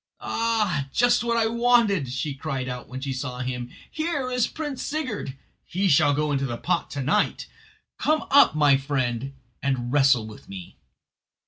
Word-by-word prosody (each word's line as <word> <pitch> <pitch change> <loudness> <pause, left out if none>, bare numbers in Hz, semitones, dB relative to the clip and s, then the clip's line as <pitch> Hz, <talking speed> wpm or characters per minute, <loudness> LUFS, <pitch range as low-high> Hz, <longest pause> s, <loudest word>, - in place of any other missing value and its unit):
"Ah, 215 -11 0
just 245 0 +3
what 235 0 0
I 225 - +3
wanted!" 230 - +2
she 135 +3 -3
cried 135 -2 -4
out 125 -1 -6
when 130 +1 -6
she 135 -1 -3
saw 125 -1 -5
him; 125 -1 -4 0.2
"here 305 -5 -2
is 250 -2 +1
Prince 295 -4 -5
Sigurd. 255 - -4 0.3
He 195 +3 -1
shall 145 -1 +4
go 150 0 0
into 135 -1 0
the 120 -2 -4
pot 175 +6 -1
to 140 - -4
night. 145 - +1 0.5
Come 310 0 +1
up, 280 - +6
my 145 -3 +5
friend, 135 -2 -2 0.3
and 130 -2 -1
wrestle 135 -5 +4
with 110 -1 -12
me." 95 -3 -10
145 Hz, 165 wpm, -25 LUFS, -, 0.5 s, up